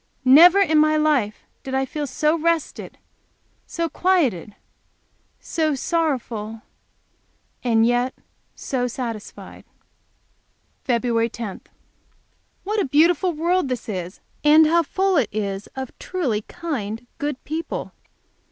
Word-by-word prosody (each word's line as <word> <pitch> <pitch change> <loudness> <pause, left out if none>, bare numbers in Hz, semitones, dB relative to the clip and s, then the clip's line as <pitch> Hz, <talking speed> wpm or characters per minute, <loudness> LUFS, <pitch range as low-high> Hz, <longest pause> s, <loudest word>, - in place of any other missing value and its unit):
Never 330 +9 +8
in 315 -6 +4
my 310 0 +4
life 285 -9 +1 0.2
did 265 0 -5
I 265 0 +1
feel 290 +2 -4
so 300 +4 +1
rested, 335 -1 -2 0.7
so 335 0 -2
quieted, 290 - 0 0.8
so 310 -3 -1
sorrowful, 245 -9 -2 1.0
and 225 -2 +3
yet 245 +2 +1 0.4
so 250 -3 -2
satisfied. 235 -3 -7 1.3
Feb 235 -1 +1
10. 230 -5 -6 1.0
What 420 +2 -1
a - - 0
beautiful 335 +5 +3
world 340 +1 +1
this 255 -2 -4
is, 185 -3 -5 0.2
and 305 +1 +7
how 335 +2 +4
full 380 +3 0
it 250 -8 +2
is 200 -1 -3
of 265 -2 -5
truly 275 - -2
kind, 245 - -5
good 290 -2 -2
people! 320 +2 -4
280 Hz, 115 wpm, -22 LUFS, 230-330 Hz, 1.3 s, Never